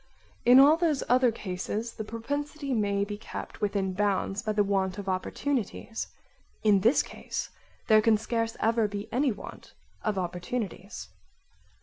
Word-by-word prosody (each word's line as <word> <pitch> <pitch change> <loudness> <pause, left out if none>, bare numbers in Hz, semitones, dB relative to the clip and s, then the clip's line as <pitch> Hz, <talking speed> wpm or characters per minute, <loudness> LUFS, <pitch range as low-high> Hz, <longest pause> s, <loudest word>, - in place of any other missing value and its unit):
3) 245 - +7
In 260 - +10
all 295 +4 +7
those 325 -5 +1
other 250 -1 +4
cases 215 +3 -4
the 220 - -5
propensity 280 +6 -4
may 200 -3 +1
be 205 0 -6
kept 225 - -8
within 200 -2 0
bounds 200 0 0
by 220 -3 -1
the 210 -1 +3
want 190 -1 0
of 200 -1 -6
opportunities; 225 +4 -2 0.6
in 210 -2 +5
this 230 +9 +4
case - - -5 0.3
there 215 -1 +6
can 220 0 +4
scarce 230 +1 -2
ever 225 -1 +2
be 205 +1 -5
any 265 +2 +2
want 205 - -10 0.3
of 215 -2 0
opportunities. 185 +3 -4
215 Hz, 150 wpm, -28 LUFS, 200-245 Hz, 0.6 s, In